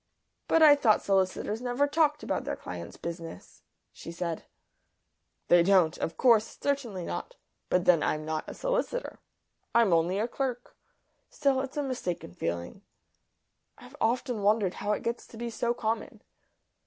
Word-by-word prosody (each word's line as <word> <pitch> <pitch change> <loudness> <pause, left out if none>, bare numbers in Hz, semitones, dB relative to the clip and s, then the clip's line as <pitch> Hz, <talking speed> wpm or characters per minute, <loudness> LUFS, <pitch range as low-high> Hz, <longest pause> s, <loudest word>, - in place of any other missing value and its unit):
"But 325 - +4
I 295 -2 +9
thought 230 -7 +3
solicitors 195 +3 0
never 250 +3 +1
talked 300 0 +1
about - - -2
their - - -3
clients' - - -8
business," 165 -1 -8 0.3
she - - -9
said. 170 -1 -4 1.0
"They 175 0 +6
don't. 175 -3 +4
Of 165 - -3
course. 225 -3 +3
Certainly 240 -11 -2
not. - - -5 0.3
But 180 -1 +2
then 170 -3 +5
I'm 155 0 -1
not 155 0 -3
a - - -7
solicitor; - - -2 0.6
I'm 230 -6 +5
only 170 +3 +2
a 220 +3 0
clerk. 245 -1 -4 0.5
Still, 275 -2 +1
it's 270 +2 -6
a 290 - 0
mistaken 185 - -4
feeling; 85 - -4 1.0
I've 250 +3 -14
often 240 -1 0
wondered 205 -2 +2
how 205 - -3
it - - -3
gets 235 +1 -3
to 225 - -13
be 235 0 -4
so 235 +1 -1
common." 225 +1 -3
220 Hz, 155 wpm, -29 LUFS, 180-265 Hz, 1.0 s, I